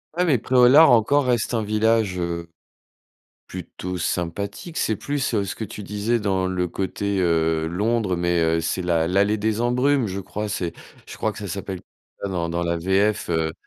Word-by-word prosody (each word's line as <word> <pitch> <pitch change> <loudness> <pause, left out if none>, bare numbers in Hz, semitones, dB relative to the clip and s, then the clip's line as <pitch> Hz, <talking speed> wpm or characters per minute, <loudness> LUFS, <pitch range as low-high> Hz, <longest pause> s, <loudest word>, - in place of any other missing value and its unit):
Ouais, 180 +1 +2
mais 150 -7 +3
Pré-au-Lard 130 +6 +6
encore 125 +5 +4
reste 120 -1 0
un 115 - +1
village, 110 -2 +1
heu, 85 -1 -3 1.0
plutôt 90 0 -6
sympathique. 100 - -3
C'est 110 - 0
plus, 140 -1 -2
heu, 100 -2 +1
ce 95 - -4
que - - -8
tu 105 0 -8
disais 105 +4 -1
dans 95 -3 0
le 90 -1 -1
côté, 100 +3 -2
heu, 80 -2 +1
Londres, 105 +2 0
mais, 85 0 +1
heu, 80 0 +2
c'est 90 +3 -2
l'a 85 -2 +1
l'allée 100 +4 +2
des 110 +1 -1
embrumes, 125 +2 +2
je 95 +1 -4
crois 105 +2 -5
c'est 90 -5 -3 0.3
je - - -9
crois 110 - -1
que - - -11
ça 105 - -6
s'appelle 95 0 -5 0.4
dans 90 -4 -2
dans 85 +1 -2
la 85 0 0
VF, 95 +4 +1
heu. 80 -2 0
100 Hz, 185 wpm, -23 LUFS, 85-110 Hz, 1.0 s, Pré-au-Lard